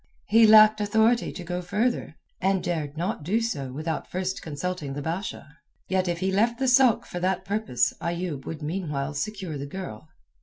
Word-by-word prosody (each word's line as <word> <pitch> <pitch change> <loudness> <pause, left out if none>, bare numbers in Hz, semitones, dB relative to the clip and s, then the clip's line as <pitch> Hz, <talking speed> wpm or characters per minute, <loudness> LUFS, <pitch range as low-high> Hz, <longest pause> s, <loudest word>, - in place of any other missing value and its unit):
He 225 +1 +7
lacked 215 0 +7
authority 220 +3 +2
to 180 - -7
go 180 +1 -3
further, 205 0 -1 0.3
dared 175 -6 -1
not 185 +6 -2
do 200 +9 +1
so 145 - -3
without 155 +4 -4
first 185 +1 -3
consulting 155 -1 -4
the 145 - -4
Basha. 165 -2 -5 0.3
Yet 185 0 +1
if 170 -1 -2
he 190 +1 +1
left 230 +5 +2
the 265 - -1
sôk 255 -2 +4
for 175 - -6
that 185 +1 -1
purpose 200 - 0
Ayoub 170 -5 -3
would 160 -1 -6
meanwhile 150 -4 -3
secure 185 -1 -4
the 140 - -5
girl. 180 -1 -8
180 Hz, 175 wpm, -26 LUFS, 155-210 Hz, 0.3 s, He